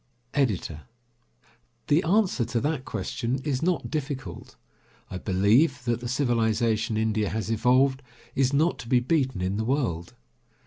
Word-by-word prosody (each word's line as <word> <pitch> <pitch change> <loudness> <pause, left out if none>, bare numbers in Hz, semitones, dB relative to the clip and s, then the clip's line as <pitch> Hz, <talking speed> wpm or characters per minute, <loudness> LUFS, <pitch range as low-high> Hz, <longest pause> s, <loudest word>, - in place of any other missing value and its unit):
EDITOR: 100 - -1 1.0
The 150 +3 +3
answer 185 - +2
to 115 +1 -1
that 150 -3 -1
question 130 0 -3
is 140 -4 -1
not 170 -3 -1
difficult. 135 - -5 0.6
I 90 - -4
believe 115 - +2
that 120 -1 0
the 120 - -5
civilization 115 -4 +1
India 110 -1 0
has 110 0 -3
evolved 130 +4 +3 0.3
is 130 -1 +2
not 155 +5 +2
to - - -8
be 125 -1 +5
beaten 130 - 0
in 95 +2 -1
the 110 - -1
world. 110 - -1
125 Hz, 140 wpm, -26 LUFS, 110-140 Hz, 1.0 s, be